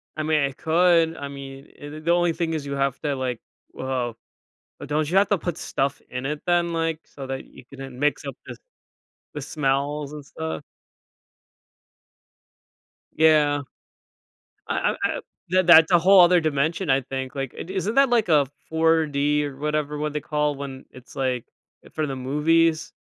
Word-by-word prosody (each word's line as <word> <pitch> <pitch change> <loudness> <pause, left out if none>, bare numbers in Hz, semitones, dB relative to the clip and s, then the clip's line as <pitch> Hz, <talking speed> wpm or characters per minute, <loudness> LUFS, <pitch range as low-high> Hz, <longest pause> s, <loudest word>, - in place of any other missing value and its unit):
I 155 - -3
mean, 155 -1 +2
it 135 -1 -2
could 165 0 +3
I 140 - -5
mean, 135 0 -9
eh, 145 - -9
the 155 +1 -8
the 160 +2 0
only 175 -1 +3
thing 165 0 -2
is 155 -3 -3
you 140 - -4
have 140 -1 -1
to, 145 -2 -1
like 130 -3 -3 0.3
well 125 -3 -3 0.6
but - - -8
don't 150 0 0
you 185 - +2
have 200 - +4
to 205 - +3
put 175 -1 -4
stuff 140 -3 -2
in 125 +1 -5
it 150 +2 -3
then, 175 -1 +2
like, 165 -1 -2
so 135 -2 -9
that 135 0 -5
you - - -15
can 135 - -14
then 135 -2 -8
mix 150 +1 0
up - - -5
the - - -9 0.8
the - - -5
smells 145 0 -1
and 150 -2 -8
stuff? 80 - -5 2.5
Yeah. 150 -2 +4 1.1
I - - -1
I - - +1
I - - 0 0.3
that 185 -1 +2
that's 165 0 +8
a 175 - +6
whole 190 +2 +6
other 175 0 +5
dimension, 155 +3 0
I 135 0 +3
think. 130 0 -5
Like, 135 -3 -4
i - - -5
isn't 190 +4 -3
that, 275 -1 +5
like, 235 -4 +2
a 145 -4 +4 0.2
4D 150 -3 +2
or 140 -2 -6
whatever 150 0 -2
what 150 0 -2
they 150 - -1
call 150 0 -1
when 135 -1 -7
it's, 130 0 -15
like, 130 -3 -1 0.4
eh, - - -14
for 155 - -1
the 135 -2 -4
movies? 155 +5 +1
150 Hz, 185 wpm, -24 LUFS, 135-165 Hz, 2.5 s, that's